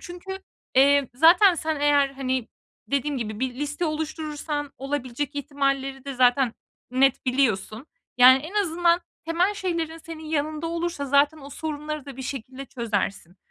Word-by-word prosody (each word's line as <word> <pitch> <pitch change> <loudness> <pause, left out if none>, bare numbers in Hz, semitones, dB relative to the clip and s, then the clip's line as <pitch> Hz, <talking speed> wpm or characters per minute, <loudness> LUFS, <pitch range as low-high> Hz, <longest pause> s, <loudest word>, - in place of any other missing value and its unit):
çünkü, 360 +2 -7 0.4
eee, 280 0 +5
zaten 345 +6 +6
sen, 315 -2 -2
eğer, 290 -1 +4
hani, 260 -3 -3 0.4
dediğim 280 0 -1
gibi 215 -1 -5
bir 255 -1 -1
liste 295 +5 -3
oluşturursan, 305 -2 -3
olabilecek 275 +1 -3
ihtimalleri 275 -2 -2
de 275 -1 -5
zaten 250 -1 +3 0.4
net 265 +1 +2
biliyorsun. 250 -1 0 0.3
Yani, 255 +1 +9
en 315 +9 -9
azından 345 0 +2 0.2
temel 350 +5 +1
şeylerin, 335 -4 -3
senin 320 -1 -9
yanında 310 +1 -2
olursa 335 -3 -3
zaten 285 +3 +3
o 280 -1 -11
sorunları 305 0 -5
da 270 -2 -9
bir 265 - -6
şekilde 260 +1 -6
çözersin. 205 -7 -3
285 Hz, 140 wpm, -25 LUFS, 260-315 Hz, 0.4 s, Yani